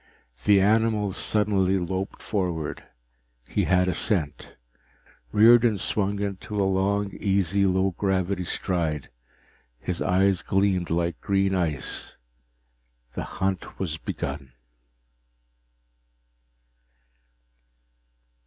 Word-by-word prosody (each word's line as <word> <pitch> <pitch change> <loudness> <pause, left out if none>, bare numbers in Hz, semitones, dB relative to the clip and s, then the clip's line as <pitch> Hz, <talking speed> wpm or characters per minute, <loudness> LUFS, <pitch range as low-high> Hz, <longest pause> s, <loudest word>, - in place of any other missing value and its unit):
The 100 -1 +6
animal 105 0 +2
suddenly 95 -2 +1
loped 95 +2 -4
forward. 90 -7 -2 0.6
He - - 0
had 90 0 +3
a 90 - +1
scent. 75 -9 -2 0.8
Riordan 115 0 +6
swung 100 +1 -1
into 100 +1 -4
a 100 - +3
long, 100 +1 +1
easy 100 -1 +2
low 95 +1 +2
gravity 95 0 -1
stride. 80 -7 -2 0.7
His 90 -2 -4
eyes 95 0 +2
gleamed 95 -1 +1
like 85 +1 -1
green 95 -1 +1
ice. 80 -7 -3 1.0
The - - -4 0.2
hunt 95 -1 -2
was 80 -5 -3
begun! 70 -3 -5
95 Hz, 90 wpm, -25 LUFS, 90-100 Hz, 1.0 s, The